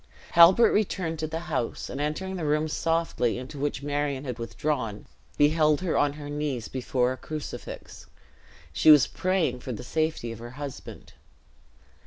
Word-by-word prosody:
Halbert 180 +7 +7
returned 180 -6 -1
to 155 - -2
the 160 +1 -4
house; 145 -9 -3
and 135 - -5
entering 190 +6 -2
the 175 - -4
room 150 +1 +1
softly, 165 -7 0
into 130 +3 -8
which 140 -1 -2
Marion 145 -1 -1
had 125 -4 -5
withdrawn, 115 -2 -3 0.3
beheld 150 +1 +3
her 180 -4 -1
on 145 -1 +2
her 145 0 -8
knees 145 -5 -3
before 125 -1 0
a 130 - -4
crucifix; 155 +3 -8 0.7
she - - +4
was 150 -4 +9
praying 180 -9 0
for 125 - -6
the 105 - -7
safety 155 -4 -1
of 115 - -8
her 120 +1 -8
husband. 145 -3 -8
145 Hz, 160 wpm, -27 LUFS, 130-160 Hz, 0.7 s, was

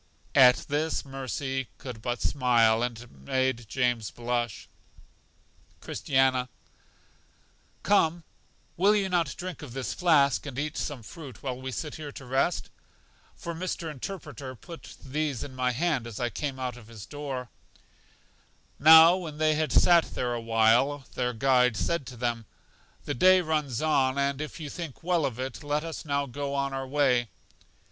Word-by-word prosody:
At 125 -3 +6
this 155 +2 -1
Mercy 135 -1 -3
could 125 -5 -8
but 120 +1 -3
smile, 115 -4 +3
and 120 -2 -2
it 120 - -14
made 120 - -2
James 120 -5 0
blush. 120 +2 -3 1.1
Christiana: 130 -2 +1 1.3
Come, 170 -4 +2 0.5
will 200 +4 +4
you 195 -2 +1
not 170 -5 0
drink 180 -1 -6
of 140 -6 -9
this 135 -1 -3
flask, 145 -6 +3
and 130 -3 -7
eat 150 +2 -2
some 140 -6 -4
fruit, 135 -1 -11
while 130 -2 -4
we 130 0 -5
sit 150 +3 -5
here 150 -2 -7
to 135 - -10
rest? 135 +7 0 0.6
For 170 -2 -6
Mr. 165 -1 -4
Interpreter 140 -3 -7
put 165 +7 -11
these 145 -2 -2
in 135 - -8
my 130 -1 +1
hand 135 -2 0
as 115 -3 -7
I 120 -1 -1
came 140 -3 -4
out 125 -2 -4
of 115 -3 -14
his 110 -4 -10
door. 135 -4 -6 1.3
Now 160 +3 +9
when 160 -5 -7
they 155 0 +3
had 155 0 -1
sat 170 -2 +4
there 120 -1 -1
a 120 - -3
while, 115 +5 +3
their 125 -1 -1
guide 125 -1 +3
said 170 +3 -1
to 125 - -9
them: 115 -2 -2 0.6
The - - -2
day 185 +8 +6
runs 150 -6 -1
on, 135 -4 +2
and 140 0 0
if 155 +2 -6
you 155 - -5
think 160 -1 -7
well 170 -4 +2
of 125 -2 -7
it, 130 +1 -5
let 145 +1 -1
us 165 -1 -6
now 140 -1 0
go 140 +2 -4
on 140 0 -1
our 135 0 -4
way. 130 -4 +2
135 Hz, 165 wpm, -28 LUFS, 125-155 Hz, 1.3 s, Now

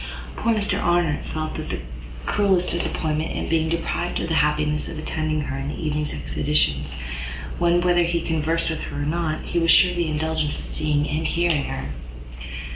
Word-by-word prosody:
Poor 230 - +1
Mr 210 -2 +1
Arnott 175 -3 +2
felt 155 0 -3
the - - -4 0.5
cruellest 190 -3 +2
disappointment 155 -2 -1
in - - -2
being 160 -1 +2
deprived 170 +1 -1
of - - -2
the - - +1
happiness 150 0 +1
of - - -6
attending 155 0 -1
her 145 -2 -3
in 135 +1 -3
her - - -4
evening's 150 -2 -1
expeditions, 70 - 0 0.6
when, 175 0 +4
whether 175 0 +4
he 170 0 +2
conversed 165 0 0
with 160 - -3
her 145 - -4
or - - -1
not, 155 0 -1
he 175 - 0
was 165 0 +2
sure 180 - +7
of 180 - -5
the 170 -1 +1
indulgence 155 -1 0
of - - -6
seeing 150 -1 0
and 155 +2 -1
hearing 170 -4 +2
her. 65 +1 -4
160 Hz, 185 wpm, -24 LUFS, 150-170 Hz, 0.6 s, sure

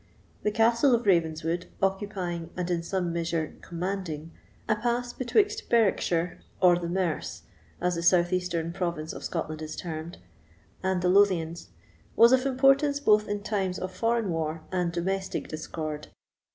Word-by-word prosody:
The - - +1
Castle 230 +4 +4
of 235 - -2
Ravenswood, 165 -1 +1
occupying, 190 -4 -2
and 180 0 -2
in 170 -1 0
some 175 0 -2
measure 165 -2 -2
commanding, 170 -3 -4 0.4
a 215 - +3
pass 240 +2 -1
betweixt 420 - +1
Berwickshire, 180 -6 +2 0.2
or 180 -2 +6
the 170 -1 -4
Merse, 175 -3 -2 0.4
as 180 0 +1
the 170 - -2
southeastern 175 -1 +2
province 170 -4 -3
of - - -8
Scotland 155 -2 -3
is 155 0 -5
termed, 165 0 -6 0.6
and 185 -1 0
the 180 - +3
Lothians, 180 -4 +3 0.5
was 230 +1 +7
of 260 +1 +4
importance 275 +2 +4
both 210 -6 +4
in 205 0 -3
times 190 -4 -1
of 185 0 -4
foreign 230 0 0
war 160 -1 -2
and 180 -2 0
domestic 190 +3 -2
discord. 155 -1 -5
180 Hz, 145 wpm, -27 LUFS, 170-210 Hz, 0.6 s, was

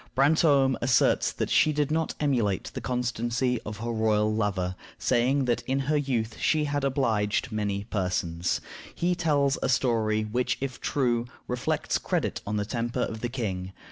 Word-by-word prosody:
Brantome 140 -1 +4
asserts 125 +1 +3
that - - -3
she 155 - +5
did 150 -1 0
not 160 0 0
emulate 120 - 0
the - - -5
constancy 125 0 -1
of 105 0 -6
her 115 +3 -3
royal 110 -1 +2
lover, 95 -4 -1 0.2
saying 130 +3 +2
that 120 -1 +1
in 135 +1 +1
her 150 +3 0
youth 125 -6 -1
she 155 -1 +2
had 145 -1 -1
"obliged 120 -4 0
many 100 -2 -1
persons." 90 -4 -1 0.3
He 175 +1 +1
tells 145 -5 +1
a - - 0
story 110 -4 +2
which, 120 +4 -1
if 135 -2 -5
true, 120 -4 0 0.2
reflects 125 0 -1
credit - - -1
on 105 +1 -1
the 105 - -1
temper 115 +2 -2
of 110 -1 -3
the 120 - -2
king. 95 -7 -4
120 Hz, 165 wpm, -27 LUFS, 110-135 Hz, 0.3 s, she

